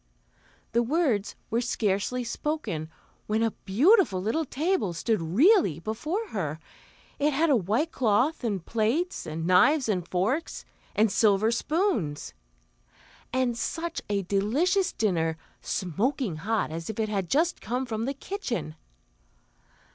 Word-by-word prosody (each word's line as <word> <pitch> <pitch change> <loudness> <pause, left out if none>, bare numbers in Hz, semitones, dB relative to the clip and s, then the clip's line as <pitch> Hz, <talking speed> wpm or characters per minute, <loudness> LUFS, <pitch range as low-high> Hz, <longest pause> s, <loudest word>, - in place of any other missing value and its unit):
The 235 - +3
words 245 - 0 0.2
were 230 +2 +2
scarcely 230 +1 -1
spoken, 230 - -3 0.4
when 220 +1 +1
a 225 - +1
beautiful 250 - +4
little 225 +12 -1
table 300 - 0
stood 215 +4 0
really 205 - +4
before 305 - -3
her; 160 -7 -3 0.6
it 295 +1 +2
had 315 +3 +2
a - - +6
white 225 - 0
cloth 250 +6 +1
and 200 -7 -2
plates, 235 +11 -1
and 160 +1 -4
knives 260 - +4
and 180 -5 -1
forks, 215 - -1 0.3
and 215 0 +3
silver 215 +1 +3
spoons, 235 - -1 1.0
and 255 -2 +1
such 330 +8 -3
a 200 -1 0
delicious 290 - +1
dinner, 165 -7 0 0.2
smoking 200 - -1
hot 210 +1 -1
as 165 +3 -5
if 220 - -5
it 215 -1 0
had 195 -5 -2
just 330 +5 +1
come 250 +3 -2
from 225 -2 -3
the 275 +2 -2
kitchen. 275 - -4
225 Hz, 130 wpm, -27 LUFS, 195-300 Hz, 1.0 s, a